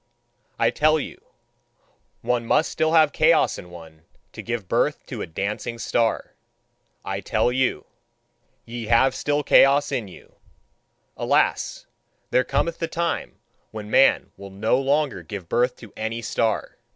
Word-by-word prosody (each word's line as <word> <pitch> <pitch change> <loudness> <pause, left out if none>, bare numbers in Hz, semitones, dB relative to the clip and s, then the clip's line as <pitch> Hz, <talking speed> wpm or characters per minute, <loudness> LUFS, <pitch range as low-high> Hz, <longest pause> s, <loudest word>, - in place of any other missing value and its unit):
I - - +2
tell 155 +1 +3
you: - - -8 1.0
one 120 0 0
must 160 - +2
still 160 0 0
have 155 -3 +5
chaos - - +3
in 90 - -11
one, 80 -2 -13 0.3
to - - -7
give 115 -5 -4
birth - - 0
to - - -6
a - - -4
dancing 105 +7 -4
star. 115 0 -1 0.7
I 95 0 -3
tell 110 +5 +1
you: 130 0 0 0.8
ye 120 0 -6
have 120 +4 +4
still 145 0 -1
chaos 140 +1 +5
in 125 -6 -2
you. 90 - -16 0.8
Alas! - - 0 0.5
There 130 - +3
cometh 170 +5 -1
the 165 - -1
time 170 +1 -3 0.3
when 110 -1 -8
man 135 - +4
will 100 0 -10
no 110 +6 0
longer 140 +1 0
give 100 -5 -8
birth 125 +6 +1
to 115 -4 -14
any 110 +1 -4
star. 110 -1 -1
120 Hz, 145 wpm, -23 LUFS, 105-140 Hz, 1.0 s, have